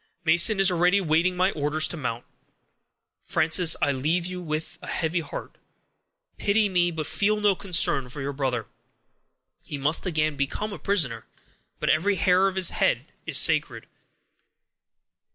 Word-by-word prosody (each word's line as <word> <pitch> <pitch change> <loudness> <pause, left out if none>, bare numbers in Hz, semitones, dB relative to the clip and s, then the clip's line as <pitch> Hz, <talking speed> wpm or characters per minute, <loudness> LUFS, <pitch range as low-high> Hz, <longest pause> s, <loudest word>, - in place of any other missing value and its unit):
Mason 175 +5 +3
is 195 -1 +5
already 180 +3 +2
waiting 175 +1 +1
my 185 +2 +2
orders 150 0 +1
to - - -4
mount. 125 -6 -5 1.0
Frances, 165 +1 +3
I 145 - +2
leave 155 +6 -1
you 180 0 -5
with 155 -2 -5
a - - -10
heavy 165 +2 -1
heart; 155 -4 -8 0.8
pity 205 0 +1
me, 175 -2 +2
but 160 -3 -5
feel 210 +5 0
no 205 -1 +3
concern 170 -9 +1
for 145 - -9
your 140 +1 -4
brother; 130 -5 -2 1.0
he 145 - -6
must 150 +7 -1
again 155 -3 0
become 140 +10 -3
a - - -8
prisoner, 140 - 0 0.5
but - - +1
every 190 +7 +1
hair 185 +2 +3
of 190 - -3
his 190 -2 +4
head - - -1 0.2
is - - +2
sacred." - - +2
170 Hz, 150 wpm, -25 LUFS, 145-185 Hz, 1.0 s, is